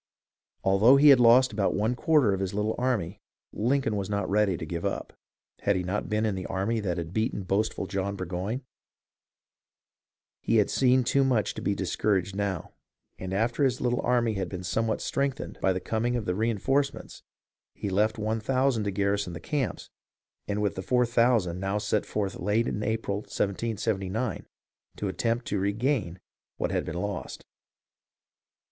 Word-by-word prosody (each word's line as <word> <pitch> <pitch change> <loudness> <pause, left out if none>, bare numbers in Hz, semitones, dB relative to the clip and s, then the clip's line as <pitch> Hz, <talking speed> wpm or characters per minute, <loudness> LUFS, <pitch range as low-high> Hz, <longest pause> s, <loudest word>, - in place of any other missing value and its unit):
Although 100 +7 +6
he 145 +2 +7
had 135 -3 +8
lost 120 +1 +6
about 100 -2 +1
one 110 +4 +1
quarter 130 -4 +3
of 95 - -2
his 95 0 -3
little 105 +1 0
army, 110 -8 -1 0.3
Lincoln 120 0 +1
was 100 -1 -3
not 100 -2 -1
ready 100 -2 +2
to 80 - -5
give 85 +1 -4
up. - - -3 0.5
Had 100 - +1
he 90 - -1
not 95 +4 -3
been 110 0 +1
in 105 - 0
the 95 -1 -4
army 100 +4 -1
that 90 -5 -2
had 85 0 -5
beaten 110 -2 -1
boastful 100 +1 -1
John 100 +1 -2
Burgoyne. 95 +6 -3
• - - -33 1.8
He - - +1
had 105 -3 +3
seen 130 -1 +4
too 135 +3 +2
much 125 -6 +1
to - - -7
be 100 - 0
discouraged 100 0 0
now, 100 -4 -2 0.5
and 95 0 -5
after 115 +7 0
his 130 -4 +2
little 125 -1 0
army 120 -2 +2
had 95 -2 -3
been 90 -1 -6
somewhat 110 +5 -1
strengthened 140 0 -2
by 95 - +3
the 95 - -1
com 110 +4 -2
ing 120 - 0
of 115 -5 -3
reenforcements, 115 +8 -1 0.5
he 100 - -4
left 105 +4 +2
one 110 +1 -1
thousand 130 -1 +1
to - - 0
garrison 100 -1 0
the 80 - -6
camps, 140 - -3 0.6
and 105 0 -1
with 100 - +1
the 95 - -5
four 125 +5 +2
thousand 115 -7 +2
now 95 +1 -2
left 105 - -2
set 105 - +1
forth 100 -3 -2
late 105 +4 +1
in 105 - -2
April, 110 -2 -1
1779, 105 +1 -2 0.5
^^ 105 - -2
attempt 115 +5 -1
to 100 - -1
regain 100 - -1 0.4
what - - -1
had - - -1
been 80 - -4
lost. 100 -1 -5
105 Hz, 180 wpm, -27 LUFS, 95-120 Hz, 1.8 s, had